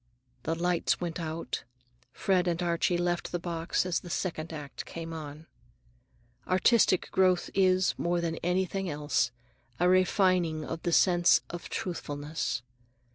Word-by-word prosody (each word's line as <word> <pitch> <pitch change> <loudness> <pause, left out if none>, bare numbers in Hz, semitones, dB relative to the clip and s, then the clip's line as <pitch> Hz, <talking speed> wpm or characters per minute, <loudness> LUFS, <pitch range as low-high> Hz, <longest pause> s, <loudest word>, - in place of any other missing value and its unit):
The 160 +5 -1
lights 175 0 +1
went 170 -1 -3
out. 165 0 -4 0.5
Fred 185 +4 +1
and 170 -1 0
Archie 170 +1 +1
left 175 0 -1
the 175 - 0
box 170 0 -1
as 180 -2 0
the 175 - -11
second 165 -2 -3
act 145 -3 -7
came 165 0 -7
on. 155 0 -8 1.0
Artistic 185 +1 +3
growth 185 -2 +2
is, 185 -1 +3
more 175 0 +1
than 170 -1 -1
it - - -6
is 175 - -2
anything 190 +1 0
else, 145 -5 0 0.5
a 180 - +4
refining 185 -3 +3
of 165 0 -5
the 175 - -1
sense 175 0 +5
of 175 0 -7
truthfulness. 145 -7 -3
175 Hz, 145 wpm, -29 LUFS, 160-180 Hz, 1.0 s, sense